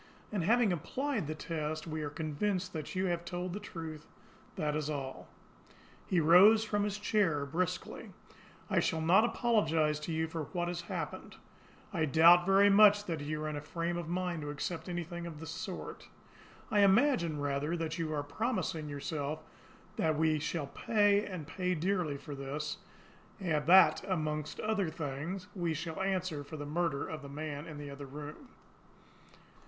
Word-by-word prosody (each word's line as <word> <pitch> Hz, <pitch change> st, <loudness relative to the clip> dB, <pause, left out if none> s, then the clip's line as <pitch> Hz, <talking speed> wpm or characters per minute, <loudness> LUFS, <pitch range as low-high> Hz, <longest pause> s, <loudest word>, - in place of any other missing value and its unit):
And 200 Hz, -5 st, -1 dB
having 225 Hz, +1 st, +4 dB
applied 240 Hz, -, -2 dB
the 155 Hz, -, -3 dB
test, 155 Hz, -1 st, -3 dB
we 155 Hz, -1 st, -4 dB
are 150 Hz, -, -3 dB
convinced 180 Hz, +5 st, -2 dB
that 155 Hz, 0 st, -5 dB
you 185 Hz, +1 st, +1 dB
have 175 Hz, -2 st, -1 dB
told 175 Hz, 0 st, -4 dB
the 205 Hz, -, -4 dB
truth 160 Hz, -5 st, -8 dB, 0.5 s
that 150 Hz, -1 st, -1 dB
is 155 Hz, -1 st, -2 dB
all." 135 Hz, -3 st, -5 dB, 0.8 s
He 180 Hz, -, +2 dB
rose 185 Hz, +8 st, +7 dB
from 205 Hz, -2 st, 0 dB
his 205 Hz, 0 st, -2 dB
chair 195 Hz, -9 st, +1 dB
brusquely. 180 Hz, +5 st, -3 dB, 0.6 s
"I -, -, +2 dB
shall 160 Hz, -, 0 dB
not 175 Hz, +7 st, +5 dB
apologise 165 Hz, -11 st, +2 dB
to 150 Hz, +2 st, -5 dB
you 160 Hz, 0 st, 0 dB
for 160 Hz, -1 st, -4 dB
what 175 Hz, +3 st, -2 dB
has 175 Hz, 0 st, -3 dB
happened. -, -, -5 dB, 0.6 s
I 160 Hz, -4 st, +1 dB
doubt 170 Hz, +4 st, +6 dB
very 195 Hz, +1 st, +6 dB
much 205 Hz, 0 st, +6 dB
if 165 Hz, -4 st, -2 dB
you 155 Hz, +1 st, -3 dB
are -, -, -2 dB
in 155 Hz, -, -3 dB
a 145 Hz, -, -4 dB
frame 170 Hz, +3 st, -3 dB
of 170 Hz, -2 st, -4 dB
mind 180 Hz, -2 st, -2 dB
to 145 Hz, -, -5 dB
accept 160 Hz, +5 st, -4 dB
anything 175 Hz, 0 st, -4 dB
of 160 Hz, -3 st, -8 dB
the 160 Hz, -, -7 dB
sort. 175 Hz, +5 st, -6 dB, 0.6 s
I 210 Hz, -, +3 dB
imagine, 200 Hz, -, +4 dB
rather, 145 Hz, +3 st, -1 dB
that 165 Hz, +1 st, -3 dB
you 160 Hz, -2 st, -1 dB
are 145 Hz, -2 st, -1 dB
promising 165 Hz, -, -2 dB
yourself 145 Hz, +1 st, -4 dB, 0.5 s
that 155 Hz, -2 st, +1 dB
we 155 Hz, -1 st, +2 dB
shall 155 Hz, 0 st, -2 dB
pay, 205 Hz, +6 st, +2 dB
and 180 Hz, -6 st, -6 dB
pay 180 Hz, +3 st, -1 dB
dearly, 175 Hz, -3 st, 0 dB
for 145 Hz, +1 st, -8 dB
this 145 Hz, +2 st, -4 dB, 0.6 s
that, 170 Hz, -1 st, +5 dB
among 155 Hz, -4 st, -1 dB, 0.2 s
other 210 Hz, -5 st, 0 dB
things, 160 Hz, +4 st, -4 dB
we 170 Hz, -4 st, -1 dB
shall 165 Hz, +3 st, -4 dB
answer 185 Hz, -6 st, -1 dB
for 150 Hz, +2 st, -8 dB
the 145 Hz, -, -5 dB
murder 155 Hz, -1 st, -1 dB
of 155 Hz, -1 st, -6 dB
that 140 Hz, -, -9 dB
man 150 Hz, +1 st, -5 dB
in 155 Hz, -2 st, -8 dB
the 145 Hz, -1 st, -7 dB
other 140 Hz, 0 st, -8 dB
room. 150 Hz, -, -9 dB
165 Hz, 170 wpm, -32 LUFS, 150-185 Hz, 0.8 s, rose